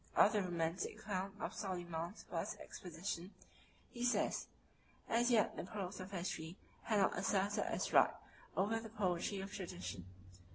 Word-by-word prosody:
Of - - +8
the 210 - +4
romantic 170 -1 -1
account 195 -1 -2
of - - -2
Soliman's 175 -1 -3
first - - -2
expedition, 180 +1 -5 0.6
he 240 - -4
says, 245 - +2 0.6
"As 240 +2 +4
yet 230 -4 +4
the - - -3
prose 195 -1 -4
of 185 0 -5
history 175 -2 -3 0.3
had 220 - +3
not 195 - +4
asserted 200 +3 +2
its - - -1
right - - +7 0.4
over 220 +4 +3
the 225 0 -7
poetry 195 -2 0
of 195 +1 -6
tradition." 175 - -5
190 Hz, 150 wpm, -39 LUFS, 175-210 Hz, 0.6 s, Of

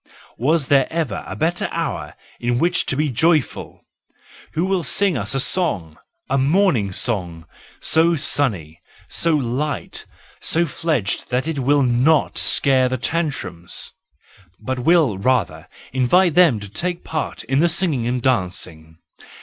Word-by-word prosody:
Was 150 +4 +2
there 135 -1 +2
ever 160 -11 -2
a 95 - -6
better 165 - -1
hour - - -4 0.2
in 120 0 0
which 175 +6 +1
to - - 0
be 150 +1 0
joyful? 155 +3 0 0.7
Who 165 +3 0
will 190 -1 0
sing 195 +2 +1
us 110 +2 -1
a - - +2
song, 95 - 0 0.3
a 135 +1 0
morning 140 - +2
song, 90 -6 -1 0.3
so 165 +1 +3
sunny, 105 - 0 0.3
so 165 -2 0
light 140 +2 -3
and - - -33 0.3
so 170 +1 +2
fledged 145 - -2
that 125 +4 -1
it 160 -3 -2
will 140 +2 +2
not 130 +5 +2
scare 130 -2 +4
the 130 - -2
tantrums,—but 120 - -3 0.9
will 145 - +3
rather 95 -9 0 0.3
invite 155 +8 +3
them 160 -10 +4
to 100 - -7
take 175 - -4
part 155 -2 -4
in 135 +4 0
the 170 +2 +3
singing 160 -9 +1
and 125 -1 -2
dancing. 90 -8 -2
135 Hz, 140 wpm, -20 LUFS, 110-160 Hz, 0.9 s, scare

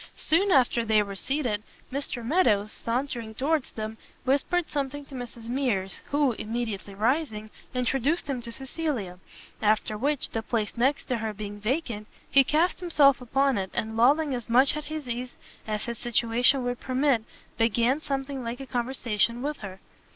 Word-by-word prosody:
Soon 380 +6 +3
after 245 -4 +4
they 215 -2 +4
were 200 -1 -6
seated, 240 0 -1 0.3
Mr 270 -4 -3
Meadows, 220 - +3
sauntering 235 -2 -2
towards 290 +3 0
them, 220 0 -5 0.2
whispered 285 +6 +1
something 285 0 -3
to 275 - -15
Mrs 240 -2 -7
Mears, 230 -8 -1
who, 285 -2 +2
immediately 220 -3 -4
rising, 220 -1 0 0.2
introduced 270 +6 +1
him 265 -4 -2
to 235 - -6
Cecilia; 265 - -3 0.4
after 215 0 +2
which, 285 +2 +1
the 225 - -1
place 220 -2 -2
next 265 +4 +1
to 250 - -1
her 220 -1 -3
being 205 0 -6
vacant, 225 -2 -2 0.2
he 275 - +7
cast 320 +8 +2
himself 290 -7 +4
upon 270 -1 +2
it, 190 -1 -3
and 220 +1 -2
lolling 280 +5 +4
as 240 -2 -4
much 260 +5 +5
at 300 -1 -4
his 310 -3 -5
ease 245 +1 -4 0.3
as 215 -1 -2
his 235 -2 -5
situation 240 +3 +3
would 245 0 -2
permit, 260 -2 +1 0.4
began 235 +4 +3
something 275 -2 -3
like 235 +2 -4
a 270 - -6
conversation 240 -2 0
with 295 0 -2
her. 195 -2 -8
245 Hz, 165 wpm, -27 LUFS, 220-275 Hz, 0.4 s, he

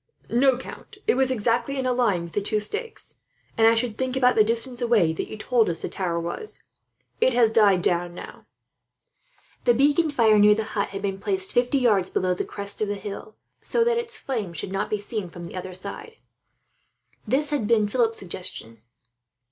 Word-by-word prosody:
"No, 255 +1 +3
count, 260 - -11
it - - +3
was 260 +1 +1
exactly 245 +3 0
in 260 - -2
a 255 - +1
line 205 -9 +1
with 170 - -10
the 205 - 0
two 210 +1 0
stakes 430 - -5 0.4
and, 225 0 +4
I 230 - +5
should 225 -1 -2
think, 260 0 -1
about 250 -1 +4
the 215 - +5
distance 235 +3 +2
away 225 -9 +2
that - - -4
you 215 - -8
told 230 0 +1
us 165 -1 -4
the - - -3
tower 175 -3 -2
was. 170 - -6 0.6
It 260 - +3
has 235 -2 +4
died 200 -5 +4
down 175 0 0
now." - - -11 1.2
The 240 -1 +4
beacon 290 +5 +3
fire 225 -7 +4
near 210 0 +6
the 220 - -2
hut 200 -1 0
had 195 0 -7
been 195 -1 -2
placed 190 -2 -1
fifty 245 +3 +2
yards 210 -8 +2
below 185 0 0
the 180 - -3
crest 200 +1 -4
of 215 - +1
the 205 - -2
hill, 205 +1 -8 0.3
so 470 - +1
that 470 0 +1
its 470 0 +3
flame 220 -10 -4
should 170 +4 -6
not 195 - -2
be 210 - 0
seen 205 -2 -5
from 175 +1 -10
the 170 - -9
other 185 0 -6
side. 200 - -7 1.1
This 285 +6 0
had 280 -8 -1
been 220 -2 +3
at 205 - -6
Philip's 230 -2 +1
suggestion. 140 - -4
220 Hz, 205 wpm, -24 LUFS, 195-250 Hz, 1.2 s, near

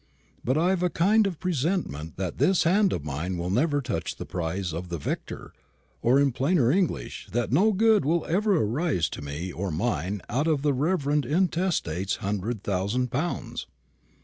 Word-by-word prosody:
But 130 +4 +1
I've 180 +3 +2
a 180 - +2
kind 205 +6 +3
of 180 -5 -5
presentiment 160 - -2
that 95 -2 -4
this 190 -1 +3
hand 190 +4 +3
of 75 - -3
mine 80 +6 -3
will 85 +1 -2
never 145 - +2
touch 85 - -3
the - - -7
prize 90 0 -3
of 85 +2 -5
the 85 - -3
victor; 75 - -5 0.5
or, 125 +4 +4
in 140 -1 +3
plainer 135 0 +2
English, 165 - -1
that 120 0 0
no 195 - +4
good 215 -1 +4
will 160 +4 +1
ever 200 +3 +2
arise 120 - +1
to - - -7
me 75 +6 -5
or 95 +3 -3
mine 90 +1 -2
out 145 +6 0
of 150 -4 +1
the 145 -2 +3
reverend 150 0 +1
intestate's 160 - 0
hundred 105 +1 -3
thousand 105 +6 -1
pounds." 160 +7 -3
130 Hz, 175 wpm, -26 LUFS, -, 0.5 s, or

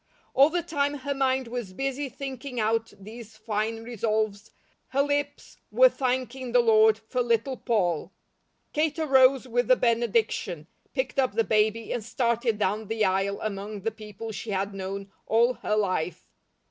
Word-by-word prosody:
All 275 +3 +6
the 345 +1 -1
time 290 -3 -1
her 280 0 -3
mind 265 -2 +1
was 230 -5 -5
busy 270 +4 -2
thinking 265 0 -6
out 225 +1 0
these 220 +2 -11
fine 220 +1 -2
resolves, 215 -2 -2 0.4
her 275 +1 +1
lips 285 0 -3
were - - +7
thanking 255 - -2
the 250 - +6
Lord 220 -2 +5
for 225 +3 -3
Little 240 +2 +1
Poll. 185 -9 0 0.6
Kate 305 +1 0
arose 265 -4 +4
with 245 0 0
the 255 - +6
benediction, 225 -9 0 0.3
picked 260 0 -1
up 260 -5 +2
the 225 +2 +2
baby, 220 +1 +1
and 240 - -3
started 235 0 0
down 210 +1 -1
the 220 0 +1
aisle 195 +1 0
among 205 0 -4
the 225 +3 -1
people 215 0 -8
she 220 +1 -7
had 195 0 -1
known 195 +1 -5 0.2
all 235 +3 +4
her 210 - -2
life. 185 -4 -1
230 Hz, 160 wpm, -27 LUFS, 210-260 Hz, 0.6 s, were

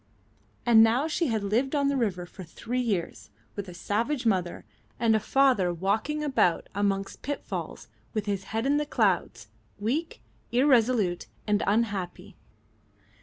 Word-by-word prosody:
And 230 -2 +7
now 235 +7 +4
she 335 +1 0
had 220 -4 -1
lived 240 +8 0
on 280 -1 +2
the 280 - +1
river 200 -8 -1
for 185 +2 -11
three 235 +8 -4
years 205 -8 -3 0.3
with 200 -2 -5
a - - -9
savage 235 - -1
mother 185 -5 0 0.3
and 225 -2 +3
a - - +3
father 250 -6 +3
walking 215 - -1
about 260 - +1
amongst 195 -1 -1
pitfalls, 285 +1 -5 0.2
with 215 -3 -2
his 200 -2 -2
head 225 +4 -2
in 285 +2 +3
the 295 0 -1
clouds, 180 - 0 0.3
weak, 260 - -2 0.3
irresolute, 240 -7 +3 0.2
and 210 -1 +1
unhappy. 200 -3 -1
220 Hz, 145 wpm, -27 LUFS, 195-255 Hz, 0.3 s, And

